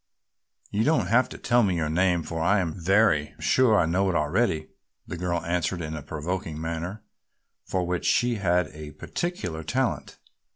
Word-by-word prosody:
"You 105 +2 +1
don't 135 - +2
have 120 +3 +4
to - - -8
tell 120 0 +3
me 95 -5 +2
your 80 -2 0
name 90 +1 +2
for 80 0 -4
I 100 +5 +3
am 85 -4 -1
very 95 -3 +2
sure 125 -5 +4
I 85 - +3
know 95 +4 +1
it 90 - -1
already," 80 +1 +1 0.4
the - - -6
girl 85 -1 -2
answered 90 +1 -1
in 80 -1 -4
a 75 - -5
provoking 80 +2 -4
manner, 85 +6 -4 0.6
for 90 -1 -1
which 90 0 -2
she 120 -2 +2
had 90 -4 +1
a 75 -1 -10
peculiar 90 - -4
talent. 125 +9 -2
90 Hz, 175 wpm, -26 LUFS, 80-105 Hz, 0.6 s, have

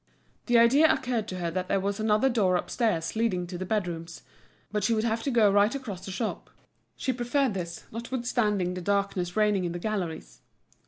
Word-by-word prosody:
The 240 -1 +4
idea 275 +7 +6
occurred 245 -7 -1
to 185 - -5
her 170 -2 -2
that 185 +1 -2
there 195 - +1
was 200 +2 -2
another 215 +3 +3
door 210 -8 +2
upstairs 180 -3 -1
leading 210 -6 0
to 175 +1 -8
the 185 - -4
bedrooms; 175 -6 -3 0.5
but 210 -1 -1
she 225 +3 +2
would 215 - 0
have 225 0 0
to 275 - -2
go 225 -5 +4
right 205 +5 +3
across 210 -9 -6
the 195 - -6
shop. 215 +4 -4 0.5
She 260 - -1
preferred 245 +1 0
this, 170 -3 -5
notwithstanding 230 -5 -1
the 180 - -5
darkness 195 -2 -1
reigning 210 -3 +3
in 175 -1 -2
the - - -3
galleries. 180 -4 -4
210 Hz, 195 wpm, -27 LUFS, 180-235 Hz, 0.5 s, idea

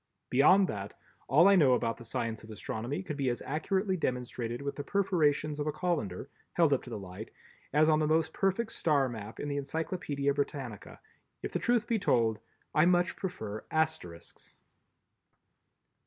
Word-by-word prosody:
Beyond 185 +9 +6
that, 100 -1 -5 0.3
all 155 +8 +6
I 200 - +7
know 145 -8 +5
about 115 -2 0
the 120 - -12
science 115 -1 -3
of 110 - -12
astronomy 110 - -4
could 150 -5 -5
be 135 -3 +1
as 120 - -3
accurately 190 +8 0
demonstrated 125 -5 -3
with 140 0 -4
the 145 - -5
perforations 155 -6 +1
of 145 - -1
a - - +1
colander, 145 - -2 0.3
held 165 -4 +4
up 135 - +1
to - - -11
the 115 - -4
light, 95 +2 -8 0.4
as 150 +2 +4
on 155 -1 +4
the 155 - +1
most 160 +1 +2
perfect 195 +4 0
star 145 -4 +2
map 110 -3 -7
in - - -3
the 145 0 -2
Encyclopedia 145 -1 -2
Britannica. 140 -6 -4 0.4
If - - -3
the - - 0
truth 240 -2 +2
must - - -27
be 230 -2 +2
told, 115 - +2 0.3
I 155 - +5
much 180 0 +3
prefer 110 - -5
Asterisks. 90 - -3
145 Hz, 175 wpm, -31 LUFS, 120-170 Hz, 0.4 s, I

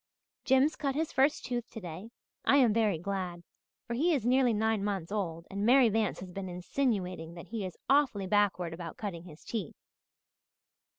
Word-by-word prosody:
"Jims 265 +4 +4
cut 275 -2 -2
his 315 +1 -1
first 275 +3 +2
tooth 240 -1 -3
today. 185 -1 -8 0.3
I - - +4
am 245 -6 +5
very 215 -5 +2
glad, 180 -1 -4 0.4
for 235 - -4
he 320 +7 +2
is 245 -6 -2
nearly 255 0 +4
nine 220 -1 +1
months 195 -4 -2
old 170 -5 -3
and 200 +1 -3
Mary 250 +1 +6
Vance 215 -4 0
has 185 -1 -8
been 190 0 -5
insinuating 180 -3 -2
that 170 - -10
he 225 -2 -3
is 180 - -10
awfully 270 -8 +3
backward 185 -4 +1
about 165 -1 -7
cutting 180 -6 -5
his 160 -3 -13
teeth. 210 -9 -4
205 Hz, 175 wpm, -31 LUFS, 180-245 Hz, 0.4 s, Mary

